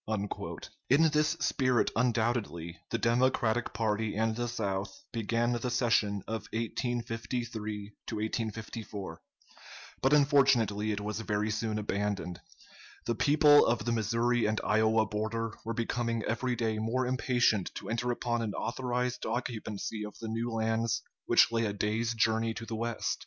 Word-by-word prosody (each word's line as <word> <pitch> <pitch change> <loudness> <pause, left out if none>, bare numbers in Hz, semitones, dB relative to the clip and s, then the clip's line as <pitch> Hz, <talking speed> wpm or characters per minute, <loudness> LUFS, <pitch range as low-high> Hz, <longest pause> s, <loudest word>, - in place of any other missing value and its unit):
In 160 +5 +5
this 150 +1 +3
spirit, 130 -3 +2
undoubtedly, 115 -8 0
the 115 - 0
Democratic 120 0 +2
party 110 -1 -1
and 110 +1 +1
the 120 +1 -1
South 100 -4 -3
began 115 +1 0
the 120 +1 -1
session 110 -5 +1
of 110 0 -4
1853 115 -2 -3 1.0
4; 95 -6 -6 0.8
but 135 - +3
unfortunately 130 -8 +4
it 105 -1 -2
was 105 +1 -3
very 105 -1 -1
soon 110 0 -1
abandoned. 100 -4 -2 0.6
The 120 - +1
people 145 +3 +6
of 115 -2 +1
the 120 - +1
Missouri 115 +1 +1
and 110 +1 0
Iowa 110 +1 +3
border 110 +2 -2
were 115 +1 -3
becoming 115 -1 -1
every 120 +3 -1
day 110 -2 -1
more 120 +4 0
impatient 125 -5 +2
to - - -7
enter 120 +2 -1
upon 120 -1 -1
an 105 -3 -3
authorized 125 0 -2
occupancy 110 -3 -3
of 105 - -8
the 115 - -6
new 115 +2 -2
lands 115 0 0 0.2
which - - +6
lay 115 0 +1
a 105 - -1
day's 110 +3 -1
journey 110 0 +1
to 115 - -6
the 115 - -4
west. 115 0 -2
115 Hz, 140 wpm, -30 LUFS, 110-120 Hz, 1.0 s, people